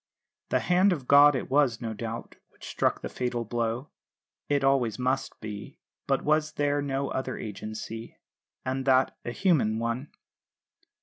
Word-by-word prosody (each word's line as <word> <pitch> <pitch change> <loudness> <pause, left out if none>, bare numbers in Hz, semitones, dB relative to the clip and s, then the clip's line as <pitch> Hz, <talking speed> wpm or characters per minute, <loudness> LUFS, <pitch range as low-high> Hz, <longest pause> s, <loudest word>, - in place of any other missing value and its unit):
"The - - +2
hand 185 +3 +4
of 135 -7 -6
God" 145 +1 +7
it 130 - -2
was, 135 -4 +2
no 115 -2 -4
doubt, 115 +1 -6
which - - -14
struck - - 0
the - - -2
fatal 120 -2 -2
blow 120 +3 -2 0.6
it 140 -1 +2
always 135 -5 +2
must 130 +1 -1
be; 105 -2 -7 0.3
but 135 -1 +1
was 155 0 +2
there 145 -1 +1
no 140 -1 -2
other 130 -1 -3
agency, 110 +2 -7 0.5
and 130 0 -2
that 130 -1 +3
a - - -4
human 125 - +2
one? 115 +5 -2
130 Hz, 150 wpm, -28 LUFS, 115-145 Hz, 0.6 s, God